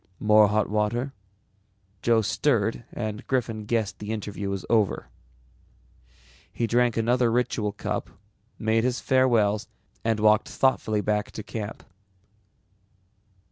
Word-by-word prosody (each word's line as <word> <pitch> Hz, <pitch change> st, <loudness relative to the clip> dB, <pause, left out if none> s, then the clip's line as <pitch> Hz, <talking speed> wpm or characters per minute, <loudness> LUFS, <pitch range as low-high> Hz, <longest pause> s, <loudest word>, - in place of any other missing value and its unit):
More 105 Hz, 0 st, +6 dB
hot 105 Hz, +1 st, +1 dB
water?" 110 Hz, +6 st, -1 dB, 0.9 s
Joe 115 Hz, -1 st, +3 dB
stirred 115 Hz, -1 st, 0 dB
and 110 Hz, -2 st, -5 dB
Griffin 115 Hz, -5 st, -1 dB
guessed 110 Hz, -1 st, -1 dB
the 105 Hz, +1 st, -5 dB
interview 105 Hz, -2 st, -4 dB
was 100 Hz, -1 st, -4 dB
over. 105 Hz, -, +1 dB, 1.4 s
He 120 Hz, -, -1 dB
drank 120 Hz, 0 st, +2 dB
another 120 Hz, +1 st, +2 dB
ritual 115 Hz, -3 st, 0 dB
cup, -, -, -4 dB, 0.5 s
made 110 Hz, 0 st, +1 dB
his 125 Hz, 0 st, 0 dB
farewells 115 Hz, -6 st, +2 dB, 0.4 s
and 115 Hz, -1 st, +1 dB
walked 105 Hz, 0 st, +4 dB
thoughtfully 110 Hz, -5 st, +1 dB
back 105 Hz, 0 st, -1 dB
to 110 Hz, -, -6 dB
camp. 110 Hz, 0 st, -6 dB
110 Hz, 115 wpm, -26 LUFS, 105-120 Hz, 1.4 s, More